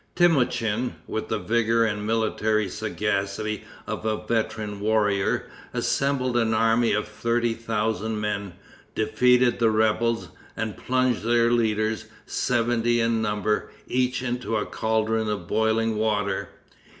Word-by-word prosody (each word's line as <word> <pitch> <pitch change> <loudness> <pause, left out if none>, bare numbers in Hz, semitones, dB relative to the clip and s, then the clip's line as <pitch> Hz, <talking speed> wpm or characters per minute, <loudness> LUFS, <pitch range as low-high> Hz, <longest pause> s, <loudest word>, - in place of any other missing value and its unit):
Temoutchin, 125 -8 +2
with - - -4
the - - -1
vigor 115 0 +2
and 105 -1 -2
military 110 -1 +1
sagacity 105 0 -2 0.2
of - - -4
a 110 -1 -2
veteran 110 -2 -2
warrior, 105 -2 +1 0.3
assembled 135 -3 0
an 110 -2 +2
army 115 +1 +3
of 105 0 0
thirty 115 +2 0
thousand 110 -1 -2
men, 100 -3 -3 0.4
defeated 125 +3 +3
the 115 -1 +4
rebels, 110 +1 +1 0.3
and 110 -4 -3
plunged 130 0 0
their 115 +1 +3
leaders, 110 -2 +1 0.2
seventy 120 -1 +1
in 115 -1 +1
number, 105 0 0 0.2
each 125 0 0
into 120 -2 -1
a 105 - -1
caldron 110 0 0
of 100 -5 -3
boiling 110 +1 +1
water. 105 -2 0
110 Hz, 125 wpm, -25 LUFS, 105-120 Hz, 0.4 s, the